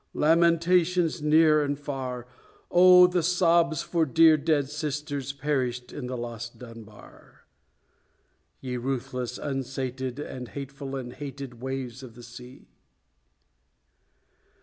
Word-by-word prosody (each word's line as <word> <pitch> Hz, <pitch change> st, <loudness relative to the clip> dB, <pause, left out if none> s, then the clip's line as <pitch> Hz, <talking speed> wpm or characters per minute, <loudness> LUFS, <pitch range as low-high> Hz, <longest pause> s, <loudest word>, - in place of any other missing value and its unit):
lamentations 170 Hz, +1 st, +2 dB
near 155 Hz, 0 st, +4 dB
and 145 Hz, 0 st, -2 dB
far! 130 Hz, -4 st, -5 dB, 0.5 s
Oh, 180 Hz, 0 st, +8 dB
the 180 Hz, 0 st, +1 dB
sobs 170 Hz, -2 st, +2 dB
for 170 Hz, -2 st, 0 dB
dear 160 Hz, +2 st, +5 dB
dead 150 Hz, -2 st, 0 dB
sisters 145 Hz, -2 st, -4 dB
perished 130 Hz, -3 st, -3 dB
in 130 Hz, -4 st, -6 dB
the 125 Hz, 0 st, -4 dB
lost 120 Hz, 0 st, -7 dB
Dunbar! 115 Hz, -3 st, -14 dB, 1.2 s
Ye 125 Hz, -2 st, -4 dB
ruthless, 125 Hz, -1 st, -4 dB
unsated, 130 Hz, -2 st, -4 dB
And 130 Hz, -4 st, -7 dB
hateful, 140 Hz, +1 st, -7 dB
and 125 Hz, -2 st, -6 dB
hated 135 Hz, -4 st, -8 dB
Waves 130 Hz, -1 st, -5 dB
of 125 Hz, -3 st, -12 dB
the 120 Hz, -, -12 dB
Sea! 125 Hz, +2 st, -13 dB
140 Hz, 110 wpm, -26 LUFS, 125-155 Hz, 1.2 s, Oh